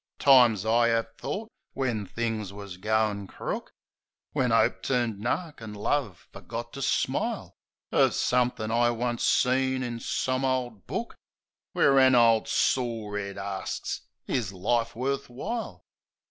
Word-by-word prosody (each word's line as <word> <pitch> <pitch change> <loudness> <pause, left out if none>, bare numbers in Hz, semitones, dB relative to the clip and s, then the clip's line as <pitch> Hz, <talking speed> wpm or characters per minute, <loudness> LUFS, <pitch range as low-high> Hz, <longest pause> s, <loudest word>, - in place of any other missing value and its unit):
Times 120 -7 +6
I 115 +1 +4
'ave 115 0 0
thought, 220 +3 -4 0.2
when 120 -7 -2
things 110 -3 -3
was 100 -2 -9
goin' 105 0 0
crook, - - -5 0.6
When - - +1
'Ope - - +3
turned 120 -5 0
nark 145 - -3
an' 110 -2 -7
Love 105 -4 -2
forgot 120 0 -7
to 140 - -6
smile, - - -1 0.4
Of - - +3
somethin' 125 -3 +1
I 120 +1 +3
once 120 0 -1
seen 130 0 +2
in 120 -1 -4
some 130 +2 -1
ole 130 -2 0
book 100 -5 -6 0.6
Where 135 -1 +5
an 130 -1 +6
ole 115 -2 +5
sore 115 -5 0
'ead 100 -1 -6
arsts, 95 -1 -4 0.2
"Is 115 -8 -1
life 115 +5 0
worf 135 +3 -2
w'ile?" 220 - -5
120 Hz, 135 wpm, -27 LUFS, 110-130 Hz, 0.6 s, Times